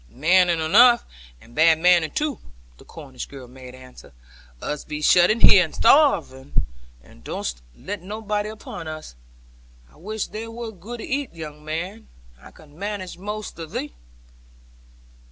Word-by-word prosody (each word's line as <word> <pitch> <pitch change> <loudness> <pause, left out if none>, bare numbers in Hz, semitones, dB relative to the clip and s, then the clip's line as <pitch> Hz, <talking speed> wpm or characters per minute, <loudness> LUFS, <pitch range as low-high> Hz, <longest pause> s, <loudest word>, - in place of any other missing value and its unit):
'Maning 175 +4 +3
enough, 235 +10 +6 0.3
and 115 - -18
bad 160 +2 +5
maning 175 -1 +4
too,' 295 - -2 0.4
the - - -14
Cornish 135 -5 -9
girl 135 -3 -11
made 130 0 -12
answer. 130 - -15 0.5
Us 150 - -4
be 150 - -6
shut 175 +3 +5
in 220 +2 +1
here, 190 -3 +8
and 160 - -7
starving, 225 - +3 0.5
and 65 -2 -19
durstn't - - -4 0.2
let 205 -2 -6
anybody 210 +2 -3
in - - -6
upon 190 -6 -9
us. 155 - -8 0.8
I - - -22
wish 215 +5 -4
thou 225 +1 -7
wer't 225 -5 -8
good 235 +4 -7
to - - -7
ate, 275 -8 -3
young 150 -2 -9
man: 180 +8 -5 0.3
I - - -13
could 155 - -18
manage 190 +2 -6
most 210 -1 -6
of 165 -1 -8
thee.' 100 - -4
175 Hz, 155 wpm, -23 LUFS, 150-215 Hz, 0.8 s, here